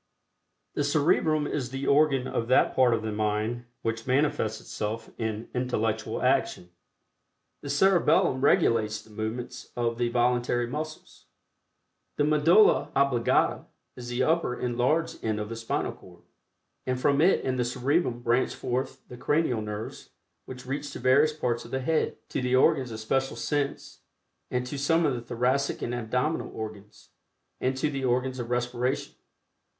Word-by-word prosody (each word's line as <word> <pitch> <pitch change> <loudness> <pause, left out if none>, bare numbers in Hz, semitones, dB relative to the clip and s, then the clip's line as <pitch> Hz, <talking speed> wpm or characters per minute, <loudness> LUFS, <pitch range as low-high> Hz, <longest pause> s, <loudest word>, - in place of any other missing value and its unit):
The 145 - 0
Cerebrum 155 +1 +2
is 135 -4 -3
the 135 +2 -4
organ 140 -3 +3
of 115 - -2
that 130 - +3
part 125 -3 +4
of 110 - -4
the 110 - -2
mind 110 +3 -1 0.2
which 115 +1 -3
manifests 130 -5 +1
itself 110 +2 -5
in 110 0 -3
intellectual 115 -3 -1
action. 90 0 +1 0.9
The 140 - -7
Cerebellum 155 -4 +3
regulates 110 -5 +3
the 110 - -17
movements 115 +4 -5
of 115 -1 -1
the 120 -1 +1
voluntary 120 0 +1
muscles. 155 +5 -7 0.9
The - - +2
Medulla 155 +8 +4
Oblongata 135 -4 +2 0.3
is 120 -1 -8
the 120 +1 0
upper 160 -3 +1
enlarged 125 +7 0
end 110 -1 -1
of 105 0 -4
the 115 - -5
spinal 115 0 -2
cord, - - -16 0.6
and 130 0 0
from 140 +2 +2
it 185 +4 +3
and 130 -1 -1
the - - +3
Cerebrum 125 +1 0
branch 120 +2 +1
forth 130 +1 -3
the 125 - -10
Cranial 140 -3 +1
Nerves 105 0 -6 0.4
which 125 -1 -9
reach 140 +2 -4
to - - -6
various 140 +4 +4
parts 125 -6 -2
of 115 - -12
the 130 - -2
head, 155 +4 0
to - - -2
the 125 0 +1
organs 130 0 +3
of 110 - -6
special 135 +3 -1
sense, 140 +4 -3 0.5
and 125 0 -1
to 140 +3 -5
some 165 +4 +2
of 145 - +2
the 120 - -4
thoracic 125 +4 0
and 120 - -2
abdominal 125 +6 -1
organs, 105 -2 -9 0.5
and 130 +1 -1
to 150 +3 0
the 135 -2 -4
organs 130 +1 0
of 120 -1 -5
respiration. 125 +2 -1
125 Hz, 155 wpm, -27 LUFS, 115-140 Hz, 0.9 s, part